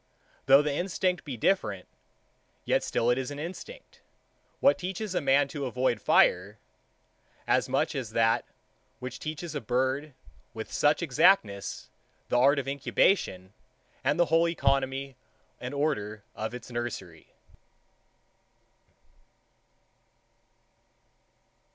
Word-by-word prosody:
Though 135 +2 +7
the 150 -1 -1
instinct 180 +1 -1
be 135 -4 -6
different, 105 - 0 0.8
yet - - +1
still 120 +1 +1
it 125 - +1
is 130 - -3
an 145 - -7
instinct, 175 - -9 0.6
which 280 - +4
teaches 190 +2 -4
a - - 0
man 140 0 +3
to 140 -2 -4
avoid 125 -2 0
the - - -27
fire; 95 +4 +3 0.9
as - - +1
much - - 0
as - - -4
that, - - +2 0.5
which 125 0 -7
teaches 155 +1 -5
a 145 - -3
bird, 130 +5 -1 0.4
with 110 0 -7
such 150 +3 +2
exactness, 125 - +2 0.4
the 120 - +2
art 140 +3 +5
of 135 -2 -2
incubation, 135 - +1 0.5
and 145 +5 +1
the 175 - +5
whole 165 +1 +4
economy 135 -4 -1 0.4
and 125 - -5
order 110 -8 -2
of 110 +2 -4
its 125 0 -10
nursery. 120 -9 -6
135 Hz, 120 wpm, -28 LUFS, 120-155 Hz, 0.9 s, Though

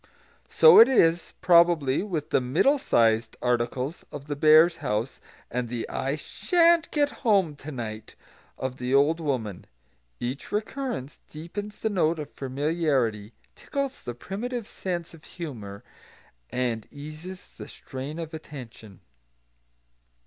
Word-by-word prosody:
So 475 -1 +8
it 230 - +10
is, 170 -9 +3
probably, 170 -6 +4
with 160 -6 -4
the - - +3
"middle 165 - +2
sized" 115 - +2
articles 125 +5 -1
of 145 -1 -8
the 145 0 -4
bears' 155 +3 +6
house 110 +5 -3 0.3
and 120 0 -2
the 120 -1 -4
"and - - -8
I 135 +2 -1
sha'n't 335 - +2
get 290 -1 +1
home 195 - +2
to 145 +2 -8
night" 110 -4 -7 0.4
of 130 0 -4
the 125 +1 0
old 150 +4 +3
woman. 125 - -3 0.5
Each 125 +3 -5
recurrence 215 - -4
deepens 205 +7 -7
the 220 - 0
note 170 -4 +1
of 150 -1 -7
familiarity, 135 -6 -1 0.2
tickles 275 -1 -4
the 120 - -6
primitive 225 - -5
sense 175 -3 -5
of 160 -2 -15
humour, 110 - -8 0.7
and 120 -3 -2
eases 155 +6 -9
the - - -11
strain 135 +4 -8
of 165 -1 -6
attention. 120 - -10
150 Hz, 135 wpm, -26 LUFS, 125-175 Hz, 0.7 s, it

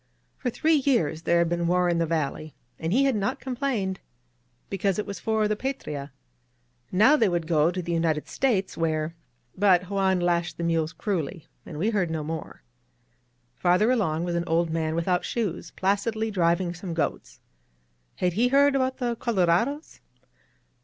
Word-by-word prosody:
For 250 - -1
three 315 +6 +2
years 230 - +1
there 170 +1 +2
had 170 0 +3
been 170 0 0
war 180 +1 +2
in 170 -1 +1
this 165 -2 0
valley, 155 -1 -2 0.2
and 160 +1 -2
he 260 +7 +4
had 270 -3 +2
not 200 -1 -1
complained. 245 -8 -2 0.7
Because 195 0 -1
it 210 - -2
was 200 -1 -6
for 220 -1 +1
the 215 - 0
Patria. 150 - -5 0.8
Now 220 +11 +5
they 225 -9 +3
would 175 -2 -1
go 160 -1 +3
to 180 0 -3
the 170 - -4
United 165 -2 0
States 215 -8 0
where 160 -1 -1 0.4
But 185 -1 +3
Juan 190 -2 +2
lashed 175 -1 0
the 170 - -4
mules 165 -1 0
cruelly, 175 -5 -3 0.2
and 150 - -7
we 205 +8 +1
heard 195 -6 0
no 160 -1 -3
more. 160 +1 -6 0.9
Farther 180 - +3
along 170 -10 0
was 175 0 -2
an 170 0 -1
old 165 0 +1
man 160 -1 -1
without 180 +2 0
shoes, 185 -8 -3
placidly 215 +4 -1
driving 175 -1 +1
some 175 -1 -6
goats. - - -3 0.8
Had 180 -1 0
he 230 +7 +3
heard 280 +2 +4
about 260 -1 0
the 240 -2 -1
colorados? 230 - 0
180 Hz, 170 wpm, -26 LUFS, 165-220 Hz, 0.9 s, Now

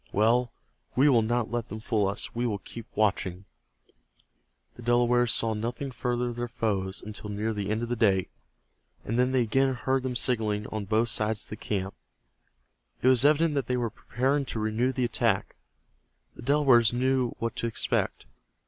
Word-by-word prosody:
Well, 115 +4 +2 0.4
we 140 +4 +5
will 120 -4 +5
not 115 +1 -1
let 120 -1 -3
them 110 - -6
fool 110 -2 0
us. 100 +1 -4
We 120 +1 -1
will 105 -3 -1
keep 115 +4 -9
watching." 95 -3 0 1.3
The - - -13
Delawares 120 0 +3
saw 115 -1 +1
nothing 120 +5 -4
further 125 -1 -1
of 120 - -7
their 120 0 -2
foes 100 -4 -2
until 105 0 -7
near 105 +2 -2
the 100 -1 -3
end 110 +2 -1
of 120 - -4
the 120 - 0
day, 100 -5 +2 0.8
and 115 +3 -1
then 125 +1 +3
they 130 -2 +3
again 135 +4 +2
heard 130 +2 0
them 125 -1 -3
signaling 110 -4 +1
on 105 -2 -3
both 110 +4 +1
sides 110 -1 -1
of - - -11
the - - -3
camp. 95 -2 -3 1.1
It 130 - +6
was 130 -1 +5
evident 155 +2 +4
that 140 -4 -1
they 125 - 0
were 120 -3 -1
preparing 135 +7 -1
to 115 - -3
renew 110 +4 0
the 130 -2 0
attack. 115 - 0 0.8
The - - -11
Delawares 130 -4 +4
knew 130 0 +1
what 115 -1 -3
to 115 - -1
expect. 115 - -1
120 Hz, 185 wpm, -27 LUFS, 110-125 Hz, 1.3 s, It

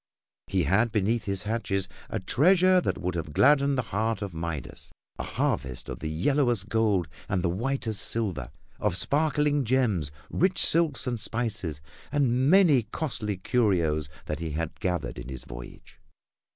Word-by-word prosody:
He 95 -2 +1
had 100 - +2
beneath 110 +2 0
his 100 -2 -1
hatches 105 -3 -2 0.2
a 110 - -2
treasure 180 - +4
that - - -1
would 90 0 -3
have 80 -3 -4
gladdened 140 - +4
the 125 - +1
heart 110 0 0
of 100 -3 -6
Midas 80 -3 -5 0.3
a - - -2
harvest 65 -1 -2
of - - -6
the 80 - -4
yellowest 120 - +1
gold 105 -7 +1 0.2
and 95 -1 0
whitest 110 +4 -1
silver 110 -6 0 0.3
of 100 -4 0
sparkling 150 - +2
gems, 110 - +1 0.2
rich 185 +1 +1
silks 160 -5 +4
and 120 -3 -2
spices, 105 -9 -2 0.3
and 130 -2 +2
many 170 -8 +6
costly 110 -4 -3
curios 90 - +1 0.2
that 75 0 -4
he 80 -3 -4
had 80 +1 -4
gathered 90 -8 -2
in - - -8
his 65 -2 -7
voyage. - - -11
105 Hz, 150 wpm, -27 LUFS, 85-130 Hz, 0.3 s, many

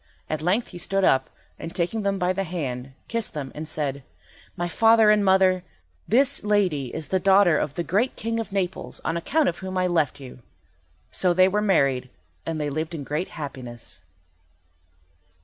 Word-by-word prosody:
At 155 -1 -2
length 190 +9 +1
he 175 - -9
stood 195 +3 0
up, 130 -6 +3 0.3
and, 165 - -7
taking 180 +6 -1
them 200 -1 0
by 180 -1 +1
the 195 +1 -1
hand, 135 -7 -4
kissed 230 -6 -3
them, 140 -3 -4
and 155 +1 -6
said— 140 -3 -2 0.6
"My 175 0 -1
father 225 +3 +5
and 210 -1 +3
my 190 -1 +5
mother, 185 -1 +3 0.4
this 270 +5 +3
lady 190 -10 +1
is 155 +5 -6
the 190 - +2
daughter 190 -4 +5
of 145 -1 -3
the 170 - -1
great 210 +9 0
King 230 +1 -2
of 225 -2 -5
Naples 195 -2 -3
on 165 - 0
account 280 - +1
of 170 - -1
whom 190 0 -5
I 185 - +2
left 160 -6 +1
you." 130 -2 -10 0.7
So 180 -2 +2
they 185 +1 +6
were 205 +2 +1
married, 140 -10 +2 0.4
and 160 -1 -2
they 150 -1 -2
lived 155 +3 -3
in 145 - -5
great 150 +6 -3
happiness. 130 -6 -7
175 Hz, 185 wpm, -24 LUFS, 150-195 Hz, 0.7 s, they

